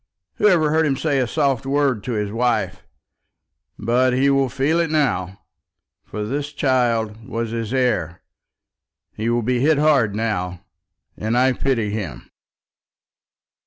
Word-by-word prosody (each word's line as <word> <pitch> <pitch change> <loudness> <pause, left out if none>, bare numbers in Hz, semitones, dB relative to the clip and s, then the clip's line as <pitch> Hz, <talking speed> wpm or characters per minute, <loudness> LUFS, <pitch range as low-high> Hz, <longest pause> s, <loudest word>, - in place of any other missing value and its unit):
Who - - +4
ever 160 -6 +3
heard 160 0 +2
him 135 -2 0
say 145 -2 0
a 125 - +1
soft 135 -1 0
word 135 -5 0
to 125 - -2
his 105 -2 -2
wife? 120 +1 -1 0.9
But 125 +3 +2
he 135 +2 +3
will 135 -1 +2
be - - -15 0.2
hit 170 -1 +1
now, 100 - -1 0.6
for 105 - -6
this 145 +5 -3
child 115 -6 0
was 115 -1 -3
his 115 -1 -3
heir. 120 -11 0 0.9
He 110 +2 -2
will 120 0 +1
be 125 +2 0
hit 150 +3 +3
hard 140 -9 +3
now, 90 -6 -3 0.5
and 110 +3 -1
I 130 +1 +4
pity 115 -6 -1
him." 85 - -6
125 Hz, 145 wpm, -21 LUFS, 110-140 Hz, 0.9 s, Who